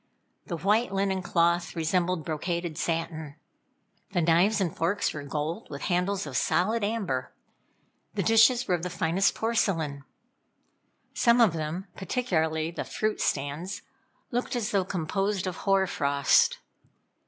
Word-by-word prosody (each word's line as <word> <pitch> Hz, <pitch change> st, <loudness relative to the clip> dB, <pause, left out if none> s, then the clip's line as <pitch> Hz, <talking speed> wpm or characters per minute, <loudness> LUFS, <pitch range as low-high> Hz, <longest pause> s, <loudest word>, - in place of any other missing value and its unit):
The 170 Hz, -, -3 dB
white 210 Hz, +7 st, +2 dB
linen 195 Hz, -1 st, 0 dB
cloth 170 Hz, 0 st, +1 dB
resembled 170 Hz, 0 st, 0 dB
brocaded 170 Hz, +1 st, -3 dB
satin. 160 Hz, -3 st, -3 dB, 0.8 s
The 175 Hz, -, +2 dB
knives 175 Hz, +6 st, +4 dB
and 180 Hz, -5 st, -1 dB
forks 180 Hz, +5 st, 0 dB
were 150 Hz, -, -5 dB
gold, 150 Hz, +3 st, -4 dB
with 140 Hz, -, -7 dB
handles 180 Hz, +1 st, 0 dB
of 140 Hz, -3 st, -7 dB
solid 215 Hz, -, +1 dB
amber. 200 Hz, -, -2 dB, 0.8 s
The 200 Hz, -, 0 dB
dishes 225 Hz, +5 st, +5 dB
were 185 Hz, -, +1 dB
of 175 Hz, -, 0 dB
the 180 Hz, -, -3 dB
finest 175 Hz, +3 st, +1 dB
porcelain. 170 Hz, -11 st, 0 dB, 1.1 s
Some 235 Hz, 0 st, +4 dB
of 225 Hz, -8 st, +5 dB
them, 160 Hz, +4 st, -3 dB
particularly 160 Hz, -7 st, -1 dB
the -, -, -4 dB
fruit 215 Hz, 0 st, -2 dB
stands, 150 Hz, +8 st, -2 dB, 0.5 s
looked 245 Hz, +1 st, -2 dB
as 240 Hz, -1 st, -1 dB
though 195 Hz, -3 st, +1 dB
composed 195 Hz, +3 st, -1 dB
of 185 Hz, -2 st, -4 dB
hoar 195 Hz, -1 st, +2 dB
frost. 140 Hz, -5 st, +3 dB
180 Hz, 135 wpm, -27 LUFS, 160-200 Hz, 1.1 s, dishes